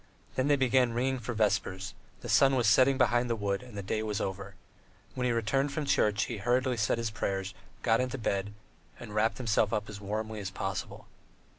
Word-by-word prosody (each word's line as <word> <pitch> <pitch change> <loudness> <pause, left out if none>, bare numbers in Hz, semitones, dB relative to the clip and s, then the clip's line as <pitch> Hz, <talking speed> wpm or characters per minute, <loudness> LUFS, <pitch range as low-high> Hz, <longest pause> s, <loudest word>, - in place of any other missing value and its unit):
Then 130 +1 0
they 145 - +5
began 130 -2 +3
ringing 130 +2 0
for 120 0 -5
vespers; 95 -3 0 0.3
the - - -7
sun 135 -1 +5
was 125 -3 +2
setting 130 +5 +5
behind 120 -1 +2
the 115 - +1
wood 100 -2 -1
and 125 -4 -11
the 100 - -4
day 110 +3 -1
was 105 -2 -2
over. 95 0 -4 0.6
When 125 - -2
he 125 - +2
returned 125 +5 0
from 155 -2 -2
church, 105 -6 +2
he 120 - -4
hurriedly 125 +5 +1
said 105 +1 +1
his 115 -2 -2
prayers, 95 -2 -3 0.3
got 115 +2 +3
into 130 +1 -2
bed, 100 -4 -1 0.5
and 110 -3 -9
wrapped 110 +2 +1
himself 110 -4 +1
up 105 -2 -1
as 100 -1 -9
warm 110 +2 -3
as 105 -3 -4
possible. 95 0 -5
110 Hz, 200 wpm, -30 LUFS, 100-125 Hz, 0.6 s, they